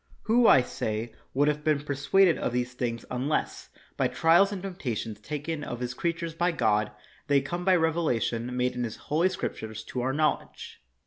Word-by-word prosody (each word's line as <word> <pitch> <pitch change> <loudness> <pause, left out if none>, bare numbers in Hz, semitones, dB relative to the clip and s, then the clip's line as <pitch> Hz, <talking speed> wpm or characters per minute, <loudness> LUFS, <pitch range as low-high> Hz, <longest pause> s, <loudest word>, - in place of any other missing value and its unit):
Who, 230 +1 +4
I 130 - +7
say, 110 -1 -4 0.2
would 145 +2 +3
have 150 0 0
been 150 -2 +2
persuaded 150 +5 +3
of - - -1
these 125 0 -1
things 120 -2 -3
un 125 +3 -2
less, 155 - -2 0.3
by - - +2
trials 175 +5 +4
and 195 -2 -5
temptations 120 - -4
taken 150 +5 -4
of 120 - -5
his 125 0 -3
creatures 170 +3 -2
by 175 +1 +1
God, 105 -6 +1 0.4
they 145 - +2
had 135 -1 +3
come 175 +5 -3
by 185 0 +4
revelation 125 - 0
made 125 0 +1
in 125 - -3
his 115 -2 -4
holy 165 +5 +1
Scriptures 110 - -5
to 125 - -4
our 130 +2 0
knowledge 155 +3 -2
145 Hz, 190 wpm, -27 LUFS, 120-170 Hz, 0.4 s, I